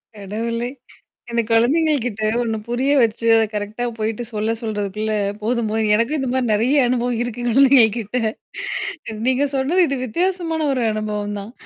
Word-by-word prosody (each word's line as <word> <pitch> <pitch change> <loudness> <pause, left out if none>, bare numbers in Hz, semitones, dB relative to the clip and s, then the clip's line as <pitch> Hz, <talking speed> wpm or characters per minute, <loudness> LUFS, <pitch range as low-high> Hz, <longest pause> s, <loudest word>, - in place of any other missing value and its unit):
கடவுளே! 230 +4 -3 0.6
இந்த 235 0 +1
குழந்தைங்கள்ட்ட 245 -3 +2
ஒண்ணு 225 -2 -1
புரிய 250 +4 0
வச்சு, 230 0 0
அத 225 - +4
கரெக்ட்டா 210 +3 -3 0.2
போயிட்டு 220 +2 -2
சொல்ல 215 +1 0
சொல்றதுக்குள்ள 215 -1 -2 0.3
போதும்போது 220 -1 0
எனக்கும் 235 +8 +1
இந்த 265 -2 -2
மாரி 260 -2 0
நெறைய 250 +6 +3
அனுபவம் 245 -1 0
இருக்கு 245 0 -5
குழந்தைங்ககிட்ட. 235 -3 +4 1.1
நீங்க 260 +2 +2
சொன்னது 320 +8 +3
இது 275 - -2
வித்தியாசமான 330 - -1
ஒரு 255 -2 -1
அனுபவம் 210 -1 -3
தான். 200 +3 -9
235 Hz, 135 wpm, -20 LUFS, 215-260 Hz, 1.1 s, அத